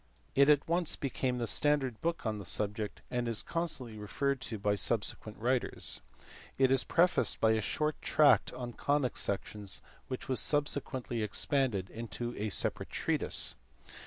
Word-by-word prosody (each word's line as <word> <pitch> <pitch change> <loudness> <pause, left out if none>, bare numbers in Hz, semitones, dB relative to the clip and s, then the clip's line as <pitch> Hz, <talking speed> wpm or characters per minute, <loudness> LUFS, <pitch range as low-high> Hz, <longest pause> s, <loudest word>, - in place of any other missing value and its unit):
It 140 +1 +5
at 145 -1 +4
once 170 0 +1
became 130 -2 -2
the 120 - -1
standard 135 -3 +3
book 165 -4 -2
on 110 -1 -2
the - - -7
subject, 105 +3 0
and 120 -1 -1
is 115 -2 +1
constantly 130 -10 -3
referred 135 +6 -1
to 110 - -5
by 105 0 +1
subsequent 105 +1 0
writers. 125 +2 0 0.6
It 130 -1 +4
is 135 -1 +4
prefaced 175 +2 +2
by 110 - +4
a 110 0 +1
short 150 +7 -2
tract 150 -2 +4
on 125 -1 -6
conic 140 +1 0
sections 100 0 -3 0.2
which 130 - -5
was 130 - +1
subsequently 130 -5 -1
expanded 105 -2 0
into 115 +1 -5
a 105 +1 -3
separate - - +1
treatise. - - +1
125 Hz, 155 wpm, -32 LUFS, 110-140 Hz, 0.6 s, It